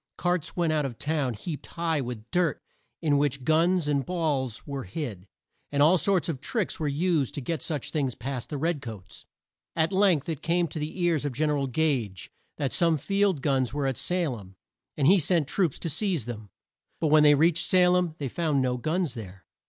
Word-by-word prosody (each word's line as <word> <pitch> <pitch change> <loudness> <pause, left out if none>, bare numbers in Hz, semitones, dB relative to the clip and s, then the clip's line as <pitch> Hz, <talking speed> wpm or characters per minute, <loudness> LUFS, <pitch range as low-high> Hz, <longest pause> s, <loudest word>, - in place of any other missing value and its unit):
Carts 175 -3 -1
went 170 -3 +1
out 150 -1 +1
of 130 -5 -4
town 145 -6 -1
heaped 150 - -6
high 165 -3 -1
with 120 -3 -7
dirt 175 -4 +1 0.4
in 145 -3 +3
which 135 -2 0
guns 165 +3 +2
and 140 -2 +1
balls 145 -9 -2
were 140 -4 -5
hid; 100 - -6 0.4
and 140 0 +3
all 165 +5 +6
sorts 195 -1 +2
of 155 -6 -3
tricks 220 - -2
were 155 - -1
used 155 -1 0
to - - -2
get 155 +2 -3
such 150 -5 -3
things 135 -5 -1
past 125 0 -5
the 150 - -3
red 160 0 -1
coats. 100 - -10 0.5
At 165 +2 +1
length 185 -7 +3
it 160 -3 -3
came 170 +1 +1
to 155 - -5
the 155 +5 -5
ears 165 -4 +2
of 145 -3 -2
Gen 150 +4 +1
er 145 - +1
al 135 - -1
Gage, 125 - -1 0.3
that 140 -3 -2
some 165 -2 +3
field 195 0 +1
guns 135 -3 +1
were 145 -1 -1
at 135 -1 0
Sa 180 +4 0
lem, 100 -8 -7 0.4
and 140 - +1
he 190 +6 +6
sent 165 -2 +1
troops 170 -2 0
there - - -19
to 165 - -1
seize 180 - 0
them. 110 -4 -7 0.5
But 160 - +1
when 155 0 +6
they 150 -1 +7
reached 165 +3 +3
Sa 180 -1 +5
lem 180 -3 +1
they 140 - -3
found 155 +1 0
no 125 -1 0
guns 155 +2 -1
there. 95 -7 -9
150 Hz, 215 wpm, -27 LUFS, 130-170 Hz, 0.5 s, they